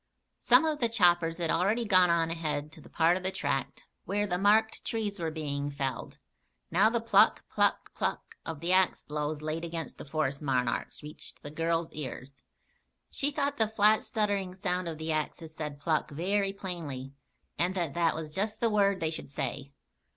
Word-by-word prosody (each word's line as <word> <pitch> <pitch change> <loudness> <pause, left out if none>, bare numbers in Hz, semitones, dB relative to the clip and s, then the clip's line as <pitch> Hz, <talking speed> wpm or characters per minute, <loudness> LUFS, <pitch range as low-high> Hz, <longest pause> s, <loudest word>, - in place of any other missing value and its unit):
Some - - +5
of 310 -2 0
the 235 - +2
choppers 175 -6 +3
had 170 -2 0
already 205 +8 +1
gone 185 -4 +5
on 165 -1 +2
ahead 155 -3 -3
to 160 - -11
the - - -15
part 170 +2 +3
of - - -6
the 185 - 0
tract 140 -7 -2 0.2
where 205 +1 0
the 180 -3 -1
marked 215 +3 +3
trees 215 -3 -2
were 165 -1 -1
being 145 -2 -3
felled. 135 -2 -4 0.5
Now 195 +6 +5
the 235 +1 0
pluck, 230 -3 +4
pluck, - - +1
pluck - - -3
of 160 -2 -6
the 175 +2 +1
axe 185 -1 +3
blows 150 0 -3
laid 155 +2 -3
against 165 -2 -5
the - - -6
forest 140 -1 -1
monarchs, 130 -1 -1
reached 150 +1 -8
the 145 - -7
girl's 165 +1 -1
ears. 140 -1 -7 0.7
She 285 - 0
thought 285 -1 -1
the 220 - +3
flat 215 0 +4
stuttering 205 -4 -1
sound 185 -2 -2
of 160 -2 -4
the 160 +1 -3
axes 155 +1 -3
said 150 -2 -6
"pluck" 155 0 0
very 195 +6 0
plainly, 160 -9 -6 0.5
and 180 +2 +1
that 170 -6 -1
that 170 0 +2
was 155 -1 -5
just 210 +4 -1
the 230 -1 +2
word 200 -3 +3
they 160 -1 0
should 155 - -6
say. 140 0 -4
170 Hz, 190 wpm, -30 LUFS, 150-200 Hz, 0.7 s, Some